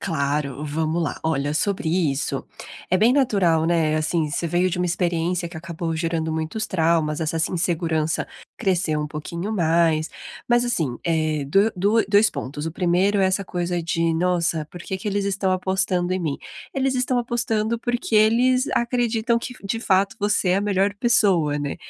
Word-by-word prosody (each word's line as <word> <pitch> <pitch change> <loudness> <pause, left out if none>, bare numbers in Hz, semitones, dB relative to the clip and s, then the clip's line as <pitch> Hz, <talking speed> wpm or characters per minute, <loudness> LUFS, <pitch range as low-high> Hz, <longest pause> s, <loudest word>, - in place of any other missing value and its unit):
Claro, 145 -4 -2
vamos 160 +3 -1
lá. 150 - -3
Olha, 145 -2 0
sobre 185 +2 -1
isso, 160 -5 -1 0.4
é 185 - +3
bem 225 +6 +4
natural, 195 - +2
né, 160 -2 +2
assim, 155 0 0
você 170 +3 -2
veio 175 +2 +1
de 180 - -3
uma 180 - +1
experiência 175 0 -1
que 165 - -10
acabou 165 0 -4
gerando 160 -1 -1
muitos 160 +8 -3
traumas, 165 -3 +1
essa 160 +1 -1
sen 160 - 0
insegurança 165 -2 0 0.3
cresceu 175 -5 0
um 150 - -3
pouquinho 170 +6 -5
mais. 165 -4 +2 0.4
Mas, 240 0 +3
assim, 160 - -1
eh, 155 -3 0
do 200 +8 +3
dua 205 +5 +2
2 210 +1 +4
pontos, 145 +3 -5
o 165 - -2
1º 185 +3 +2
é - - +4
essa 190 +1 0
coisa 175 -1 -2
de, 165 0 0
nossa, 170 -2 0
por 175 - -10
que 190 - -4
que 210 - -4
eles 200 0 -1
estão 195 -1 0
apostando 185 -1 0
em 185 - -1
mim? 150 -4 -2 0.3
Eles 270 0 0
estão 255 0 +1
apostando, 235 -2 -1
porque 240 -1 -2
eles 245 +5 +4
acreditam 235 -1 +1
que, 250 +2 -7
de 225 +3 -2
fato, 195 -2 +2
você 205 -2 +1
é 185 - +3
a - - +1
melhor 200 0 +1
pessoa, 190 -10 +2
né. 145 -1 -3
175 Hz, 180 wpm, -23 LUFS, 160-205 Hz, 0.4 s, bem